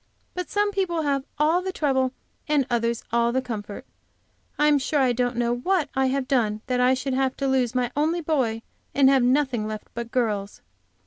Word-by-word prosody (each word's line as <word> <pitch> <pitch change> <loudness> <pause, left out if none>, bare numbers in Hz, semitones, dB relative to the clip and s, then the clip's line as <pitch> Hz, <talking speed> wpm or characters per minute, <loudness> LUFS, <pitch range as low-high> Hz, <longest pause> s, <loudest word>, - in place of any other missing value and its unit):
But 360 -2 -5
some 410 0 +1
people 360 -5 -1
have 275 -2 0
all 315 +4 +3
the 375 +1 -3
trouble 265 -6 +1 0.4
and 295 -3 +2
others 235 -1 0
all 235 0 +3
the 260 - +1
comfort. 215 -5 -6 0.7
I 295 - +3
am, 295 -1 +4
sure 290 +2 0
I 255 -2 +3
don't 245 +1 -1
know 240 0 +1
what 335 +2 0
I 265 0 +2
have 265 0 -1
done 215 -6 +1
that 250 -1 -1
I 250 +1 +4
should 260 +1 -3
have 265 0 0
to 275 - -1
lose 255 -2 +1
my 245 -1 0
only 320 +4 +1
boy, 255 -8 0 0.3
and 275 -1 +6
have 270 -1 +4
nothing 250 -3 +1
left 215 0 -6
but 235 0 -5
girls. 210 -5 -2
260 Hz, 200 wpm, -24 LUFS, 240-295 Hz, 0.7 s, and